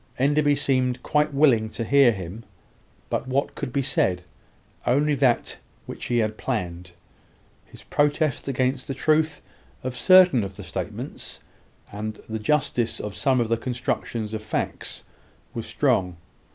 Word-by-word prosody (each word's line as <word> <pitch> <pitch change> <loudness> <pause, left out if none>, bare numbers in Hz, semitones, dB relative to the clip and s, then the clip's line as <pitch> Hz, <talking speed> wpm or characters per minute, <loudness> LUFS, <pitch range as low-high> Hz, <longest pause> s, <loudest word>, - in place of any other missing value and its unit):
Enderby 145 +2 +3
seemed 130 -3 0
quite 150 0 +1
willing 135 -7 +3
to 115 - -4
hear 135 +1 +5
him; 95 +2 -7 0.7
but - - -1
what 135 +2 0
could 140 -4 -5
be 140 +2 0
said? 90 -9 +1 0.6
Only 145 +4 +3
that 130 -4 +1 0.3
which - - -7
he 120 - 0
had 110 -1 0
planned. 90 -7 -3 0.7
His - - -15
protest 145 -1 0
against 130 0 0
the 135 - -3
truth 155 +2 +1 0.4
of 130 0 -3
certain 180 - +6
of 95 -1 -6
the 100 - -8
statements, - - -6 0.5
and 105 +1 -5
the 110 0 -4
justice 120 -1 0
of 105 -1 -5
some 130 -2 +2
of 120 - +1
the 115 +1 +1
constructions 115 -2 -3
of 110 - -3
facts, 110 - -4 0.5
was - - -5
strong. 90 -2 +1
125 Hz, 145 wpm, -24 LUFS, 110-140 Hz, 0.7 s, certain